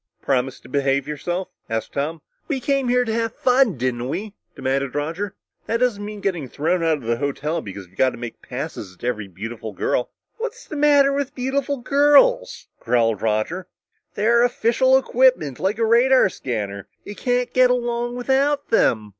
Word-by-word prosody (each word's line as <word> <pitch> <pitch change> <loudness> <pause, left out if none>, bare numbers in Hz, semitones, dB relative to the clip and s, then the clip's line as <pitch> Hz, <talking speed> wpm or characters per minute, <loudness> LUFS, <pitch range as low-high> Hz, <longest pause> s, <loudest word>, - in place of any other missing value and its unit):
"Promise 130 -1 0
to - - -15
behave 140 +1 0
yourself?" 175 +5 -3 0.2
asked 110 -1 -3
Tom. 155 +4 -3 0.2
"We 285 -5 -1
came 275 0 0
here 250 0 +3
to 225 - -2
have 230 0 -1
fun, 250 - +3
didn't 125 0 -2
we?" 205 +7 -4 0.2
demanded 135 0 -1
Roger. 165 +7 -3 0.3
"That 230 - +1
doesn't 230 -5 +1
mean 210 0 -7
getting 175 -10 -2
thrown 170 +7 0
out 160 -2 +2
of 140 - -12
the 115 +1 0
hotel 150 +4 -2
because 100 -4 -8
you've 90 +1 -25
got 130 - +5
to - - -9
make 120 -1 -8
passes 95 -2 -6
at - - -23
every 115 -5 -2
beautiful 110 +3 -7
girl." 120 +5 -1 0.3
"What's 470 0 -5
the - - -8
matter 285 -1 +4
with 280 0 -2
beautiful 275 +2 -1
girls?" 290 - +3
growled 115 -3 +1
Roger. 115 - -1 0.5
"They're 235 +3 +3
official 245 +2 +3
equipment, 255 - +2
like 195 +3 0
a 230 - +2
radar 240 +1 +5
scanner. 100 - -4 0.2
You 205 - -6
can't 245 +3 -1
get 255 0 +5
along 240 -1 -1
without 270 +3 +1
them!" 110 - +2
195 Hz, 175 wpm, -22 LUFS, -, 0.5 s, got